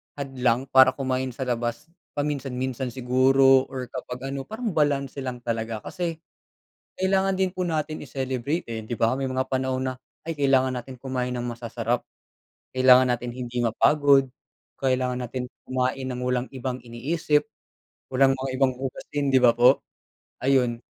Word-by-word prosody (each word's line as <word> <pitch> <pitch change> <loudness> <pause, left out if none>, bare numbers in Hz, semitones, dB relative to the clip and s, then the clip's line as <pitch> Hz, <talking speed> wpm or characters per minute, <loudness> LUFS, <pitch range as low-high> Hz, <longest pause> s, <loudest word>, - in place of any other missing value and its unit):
hadlang 130 -3 0
para 130 0 +7
kumain 130 -2 -2
sa 135 - -3
labas 120 +5 -3 0.2
paminsan-minsan 130 -3 -2
siguro 130 +1 +4
or 130 -2 -6
kapag 125 +1 -6
ano, 135 -1 -5
parang 225 -1 -3
balanse 140 -3 0
lang 125 -2 -5
talaga. 115 -2 -3
Kasi, 175 -3 -3 0.8
kailangan 190 +1 +1
din 190 0 +1
po 180 0 -3
natin 155 -2 -2
i-celebrate, 130 +4 -2
eh, 110 -1 -5
'di 120 - -4
ba? 115 +3 +1
May 135 - -2
mga 130 0 -2
panahon 130 -1 -1
na, - - -4 0.4
ay 160 - -3
kailangan 135 -2 +3
natin 125 +2 -7
kumain 125 -2 -2
ng 120 - -3
masasarap, 120 0 -3 0.7
kailangan 130 0 +7
natin 120 0 -1
hindi 120 -1 -3
mapagod, 140 +3 +4 0.5
kailangan 130 -1 0
natin 125 +1 -4 0.2
kumain 130 +1 -1
ng 125 - -4
walang 125 0 -1
ibang 130 -1 -5
iniisip, 150 +5 0 0.7
walang 135 +1 +4
mga 130 0 -4
ibang 130 -2 +3
hugasin, 135 +2 -3
'di 130 - +6
ba 120 -2 +5
po? 125 +3 +6 0.6
Ayun. 125 -3 +2
130 Hz, 150 wpm, -25 LUFS, 125-135 Hz, 0.8 s, para